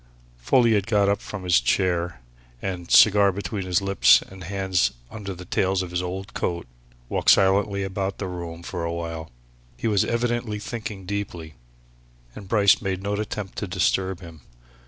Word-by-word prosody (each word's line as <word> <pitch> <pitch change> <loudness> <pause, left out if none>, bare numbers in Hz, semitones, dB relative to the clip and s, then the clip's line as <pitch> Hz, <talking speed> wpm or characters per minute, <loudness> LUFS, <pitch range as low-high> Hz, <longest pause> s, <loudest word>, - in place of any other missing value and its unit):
Folliot 110 - +3
got 105 -3 +3
up 100 0 0
from 105 -3 -7
his 90 -7 +4
chair 85 +2 0 0.4
and, 90 0 -5
cigar 100 -2 +6
between 95 0 -4
his 90 +1 +1
lips 100 -1 +5
and 95 -1 -12
hands 95 -8 0 0.2
under 100 -3 -6
the 90 +1 -10
tails 95 +1 0
of 90 - -8
his 90 0 -1
old 95 +2 -5
coat, 85 -1 -2 0.4
walked - - 0
silently 100 +1 +4
about 95 0 -3
the 100 - -4
quiet 90 -1 -5
room 85 0 -7
for 85 -1 -5
awhile. 85 -1 -4 0.5
He - - -2
was 105 -3 +3
evidently 120 -2 -1
thinking 105 -3 -6
deeply, 90 -5 -5 0.8
and 100 -2 -10
Bryce 100 -1 +4
made 95 -1 -3
no 100 +1 -2
attempt 105 -1 -4
to 105 - -4
disturb 95 0 0
him. 85 -4 -12
95 Hz, 165 wpm, -24 LUFS, 90-100 Hz, 0.8 s, cigar